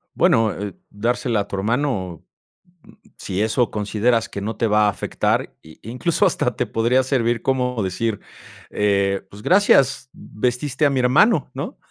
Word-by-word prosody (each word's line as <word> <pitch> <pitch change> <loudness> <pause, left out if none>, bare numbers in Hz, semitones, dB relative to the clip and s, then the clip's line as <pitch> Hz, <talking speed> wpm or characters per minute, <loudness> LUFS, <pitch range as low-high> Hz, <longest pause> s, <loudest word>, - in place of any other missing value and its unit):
Bueno, 115 -1 +3
eh, 100 -2 -6 0.2
dársela 115 +1 -1
a 100 - -6
tu - - -5
hermano, 105 - -2 0.9
si 95 +1 -3
eso 110 +2 +1
consideras 110 +2 0
que 100 - -6
no 110 +3 -4
te 115 - +1
va 105 0 +3
a - - +4
afectar, 100 - -2
i 80 0 -16
incluso 125 - 0
hasta - - 0
te - - -1
podría 120 +3 +2
servir 120 -3 0
como 125 -3 -1
decir, 105 +3 -2 0.5
eh, 100 -1 0
"Pues 100 - -12
gracias, 140 - +3
vestiste 125 +6 -2
a - - +4
mi 135 -2 0
hermano, 150 - +3
¿no?". - - -6
115 Hz, 155 wpm, -21 LUFS, 105-125 Hz, 0.9 s, a